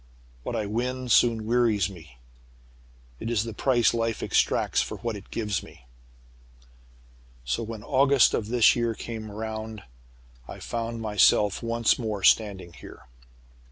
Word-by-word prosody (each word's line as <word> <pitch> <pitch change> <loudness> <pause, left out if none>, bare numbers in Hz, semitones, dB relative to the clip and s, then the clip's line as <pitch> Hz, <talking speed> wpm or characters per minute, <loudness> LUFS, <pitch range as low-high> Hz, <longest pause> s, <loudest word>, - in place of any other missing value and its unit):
What - - -5
I 105 - -2
win 125 +4 -3
soon 115 -2 +3
wearies 115 -5 +2
me. 80 -9 -13 1.0
It - - -4
is 115 -3 +1
the 115 -1 -6
price 120 +1 +2
life 115 -1 -2
exacts - - +1
for - - -5
what 115 -2 -4
it 100 - -11
gives 105 -4 -2
me. - - -16 1.6
"So, 60 - -1
when 110 -2 -7
August 140 -1 +4
of 105 - -1
this 120 0 +4
year 115 -1 -1
came 110 -1 -7
round, 110 0 -6 0.6
I - - -9
found 115 0 -4
myself 105 -1 +3
once 115 0 +1
more 105 -5 -4
standing 95 -5 +2
here. - - -13
110 Hz, 140 wpm, -26 LUFS, 105-115 Hz, 1.6 s, August